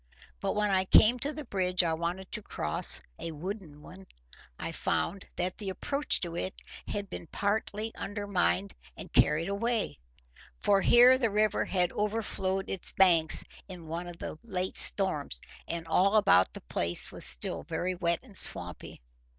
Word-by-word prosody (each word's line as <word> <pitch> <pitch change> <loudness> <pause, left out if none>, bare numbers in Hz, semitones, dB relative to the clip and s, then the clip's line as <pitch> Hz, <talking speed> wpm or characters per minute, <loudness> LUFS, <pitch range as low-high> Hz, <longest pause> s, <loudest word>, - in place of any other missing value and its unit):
But - - -3
when 210 -1 0
I 190 -1 +1
came 230 +5 +4
to 285 +4 -3
the 305 -1 -8
bridge 185 -4 -1
I 165 -1 -1
wanted 175 +3 -5
to 215 - -1
cross—a 75 - +3
wooden 160 -2 -8
one—I 60 - -12
found 195 - -3
that 180 +2 -4
the 200 -2 -5
approach 280 +9 -1
to 170 -3 -5
it 185 +2 -5 0.3
had 200 -1 -5
been 170 - -9
partly 210 +3 -3
undermined 185 - -2 0.2
and - - -10
carried 160 +2 +2
away, 220 - -3 0.6
for 195 - +1
here 250 +4 +5
the 230 -4 0
river 215 0 0
had 180 -2 -1
overflowed 200 -3 -3
its 190 - +1
banks 170 -4 +6 0.2
in 180 -4 -11
one 170 +2 -6
of 175 -1 -10
the 155 - -8
late 185 -5 -3
storms; 150 - +5 0.3
and 170 0 -5
all 195 +5 +2
about 95 - +3
the - - -9
place 85 +8 0
was - - -3
still - - 0
very 185 +1 -4
wet 170 -2 -2
and 230 -7 -14
swampy. - - 0
185 Hz, 160 wpm, -28 LUFS, 165-205 Hz, 0.6 s, banks